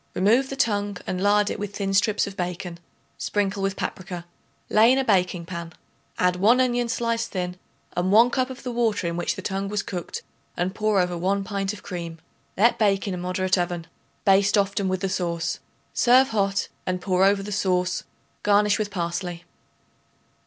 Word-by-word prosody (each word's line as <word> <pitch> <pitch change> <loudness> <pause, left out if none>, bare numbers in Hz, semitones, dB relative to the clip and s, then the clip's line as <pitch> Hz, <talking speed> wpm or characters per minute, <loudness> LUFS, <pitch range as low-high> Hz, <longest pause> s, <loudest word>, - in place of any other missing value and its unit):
Remove 235 +8 +3
the 275 - -4
tongue 205 -6 0
and 185 0 -3
lard 205 +1 +3
it - - -4
with 205 -1 -5
thin 195 -1 -2
strips 210 +1 +3
of 195 - -7
bacon; 180 -1 -4 0.4
sprinkle 200 -1 -1
with 195 0 0
paprica; 180 -3 -5 0.4
lay 225 +3 +5
in 260 - +4
a 270 - +2
baking 180 -6 +1
pan; 170 -1 -6 0.4
add 180 0 +2
1 220 +7 +5
onion 245 -2 +1
sliced 230 -1 -1
thin 180 -2 -3 0.4
and 180 +2 0
1 230 +4 +6
cup 255 0 0
of 260 0 -9
the 250 - -3
water 230 -5 0
in 170 0 -1
which 175 0 -1
the 190 - -7
tongue 195 +1 -2
was 210 0 -1
cooked 175 -3 -5 0.3
and 180 +2 -1
pour 215 -1 +1
over 180 -1 +1
1 195 +3 0
pint 195 0 -2
of 210 - -10
cream. 170 -3 -6 0.4
Let 230 +5 +4
bake 200 -2 +2
in 195 - -1
a - - -3
moderate 185 +1 0
oven. 175 -1 -2 0.4
Baste 195 +1 +4
often 200 -1 +1
with 185 -1 -1
the 195 - 0
sauce. 175 -3 -2 0.3
Serve 255 +2 +5
hot, 200 -2 0 0.2
and 185 0 0
pour 185 0 +1
over 195 0 +3
the 210 - -6
sauce; 185 -2 0 0.4
garnish 205 0 +3
with 210 -1 -1
parsley. 175 -1 -3
195 Hz, 190 wpm, -24 LUFS, 180-210 Hz, 0.4 s, 1